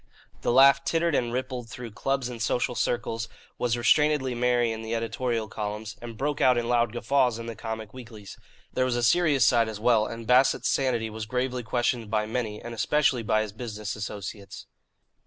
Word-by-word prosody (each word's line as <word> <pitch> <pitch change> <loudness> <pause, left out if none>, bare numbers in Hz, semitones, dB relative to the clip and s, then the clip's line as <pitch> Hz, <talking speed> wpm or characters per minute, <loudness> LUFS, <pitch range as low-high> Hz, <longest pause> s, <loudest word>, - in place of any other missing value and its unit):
The - - 0
laugh 135 +2 +6
tittered 165 0 +1
and 120 -4 0
rippled 125 -1 -4
through 125 -2 -8
clubs 135 +4 -1
and 120 -2 -7
social 125 +1 0
circles, 115 -2 -2 0.3
was 120 -1 0
restrainedly 145 +1 +3
merry 120 -1 +2
in 110 0 -5
the 110 +1 -3
editorial 115 0 -2
columns, 105 +1 -5
and 115 -2 -8
broke 145 +3 -2
out 125 -1 +5
in 120 -1 -1
loud 120 -2 +2
guffaws 125 0 +1
in 115 - -7
the 115 -1 -6
comic 110 -2 -6
weeklies. 115 -5 -10 0.4
There 130 - +1
was 125 -1 0
a 120 - -1
serious 145 -1 +4
side 115 -1 +3
as 110 -1 -6
well, 110 -1 +3
and 115 0 -7
Bassett's 125 +3 +3
sanity 120 -5 0
was 110 0 -6
gravely 125 +1 -1
questioned 120 -1 -1
by 105 0 0
many, 110 -2 -3
and 120 - -8
especially 135 +1 +1
by 110 -1 +1
his 105 -2 -7
business 110 -2 -5
associates. 105 -1 -7
120 Hz, 190 wpm, -26 LUFS, 110-125 Hz, 0.4 s, laugh